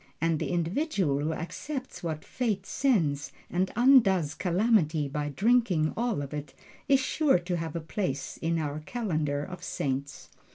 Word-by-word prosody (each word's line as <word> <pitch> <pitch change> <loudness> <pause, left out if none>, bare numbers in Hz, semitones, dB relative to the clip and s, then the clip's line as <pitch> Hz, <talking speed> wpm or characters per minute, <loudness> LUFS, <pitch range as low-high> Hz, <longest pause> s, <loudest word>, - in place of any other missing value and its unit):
And 165 -1 +1
the - - -2
individual 175 - 0
who 150 +2 -1
accepts 260 - -5
what 160 -3 -4
Fate 215 -6 -2
sends, 165 - +1 0.2
and 185 +2 0
undoes 210 - +5
Calamity 175 -5 +2
by 145 +1 -3
drinking 195 - +2
all 230 -10 0
of 140 - -7
it, 150 -1 -6 0.3
is 275 -2 +5
sure 275 -1 +3
to 175 0 -2
have 165 -1 -4
a 170 - -2
place 160 -4 -3
in 165 0 0
our 150 -2 -2
calendar 155 -7 -2
of 180 +1 -8
saints. 135 0 -3
170 Hz, 155 wpm, -28 LUFS, 150-225 Hz, 0.3 s, undoes